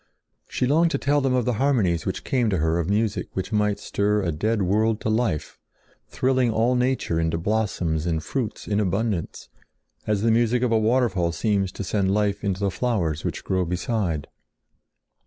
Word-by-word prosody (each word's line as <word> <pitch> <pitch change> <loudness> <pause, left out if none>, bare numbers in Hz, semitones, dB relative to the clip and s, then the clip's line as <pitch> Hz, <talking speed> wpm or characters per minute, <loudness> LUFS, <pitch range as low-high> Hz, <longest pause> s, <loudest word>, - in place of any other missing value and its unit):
She - - -1
longed 160 +6 +3
to - - 0
tell 145 +1 +1
them 135 -1 +1
of 125 -3 +1
the 125 - +1
harmonies 105 - +1
which 95 - -3
came 125 -4 +1
to 95 - +1
her 80 +1 +1
of 85 +1 -2
music 105 0 0
which 95 +3 -4
might 105 -1 +1
stir 105 0 0
a 85 - 0
dead 105 +7 0
world 110 +4 +1
to - - -1
life, 110 -8 -1 0.5
thrilling 130 -1 +1
all 115 +3 +2
nature 125 -9 0
into 80 0 0
blossoms 90 -5 -1
and 80 -2 -1
fruits 125 -1 -4
in 105 0 +1
abundance, 100 -2 -2 0.6
as 105 -1 0
the 115 - +3
music 120 +2 +2
of 125 - +1
a 115 - +4
waterfall 110 -7 +1
seems 100 +2 0
to - - -5
send 95 -1 0
life 105 0 0
into 95 -2 -1
the 100 -1 +1
flowers 95 -9 -1
which - - -4
grow 95 -1 0
beside. 90 -3 -2
105 Hz, 185 wpm, -24 LUFS, 90-120 Hz, 0.6 s, a